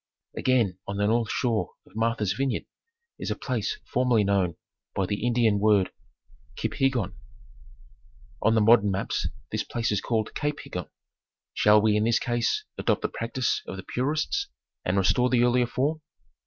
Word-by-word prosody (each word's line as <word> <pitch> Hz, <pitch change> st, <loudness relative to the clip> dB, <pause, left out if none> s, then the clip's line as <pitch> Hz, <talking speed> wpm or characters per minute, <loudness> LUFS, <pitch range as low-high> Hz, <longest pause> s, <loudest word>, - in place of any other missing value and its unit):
Again 115 Hz, -8 st, +1 dB
on 100 Hz, -, -3 dB
the 100 Hz, -, +1 dB
north 115 Hz, +1 st, +1 dB
shore 115 Hz, -3 st, -1 dB
of -, -, -22 dB
Martha's 115 Hz, -3 st, 0 dB
Vineyard 135 Hz, -1 st, -1 dB, 0.5 s
is -, -, -4 dB
a -, -, -1 dB
place 430 Hz, -, -2 dB, 0.2 s
for 125 Hz, -, +3 dB
merly 115 Hz, -5 st, +3 dB
known 95 Hz, -4 st, +1 dB, 0.4 s
by 95 Hz, -, +1 dB
the 105 Hz, +3 st, -3 dB
Indian 115 Hz, -4 st, +3 dB
word 100 Hz, -3 st, +3 dB, 0.6 s
Kiphiggon. 125 Hz, -8 st, 0 dB, 1.3 s
On 115 Hz, -, +3 dB
the 110 Hz, -, +4 dB
modern 105 Hz, -1 st, +6 dB
maps 95 Hz, 0 st, -1 dB, 0.2 s
this -, -, -1 dB
place 115 Hz, -2 st, -2 dB
is 105 Hz, -, 0 dB
called 110 Hz, -2 st, -1 dB
Cape 150 Hz, 0 st, -2 dB
Higgon. 90 Hz, -5 st, -6 dB, 0.6 s
Shall 105 Hz, 0 st, +5 dB
we 110 Hz, -1 st, +4 dB
in 105 Hz, -, +2 dB
this 115 Hz, 0 st, +3 dB
case 120 Hz, -1 st, 0 dB
adopt -, -, +1 dB
the -, -, 0 dB
practice 120 Hz, +2 st, -1 dB
of 95 Hz, -, -6 dB
the 95 Hz, -, -7 dB
purists 155 Hz, -, 0 dB, 0.4 s
and 90 Hz, +2 st, 0 dB
restore 110 Hz, +6 st, +3 dB
the 120 Hz, -1 st, +3 dB
earlier 125 Hz, 0 st, +3 dB
form? 150 Hz, +6 st, -1 dB
115 Hz, 165 wpm, -26 LUFS, 100-125 Hz, 1.3 s, modern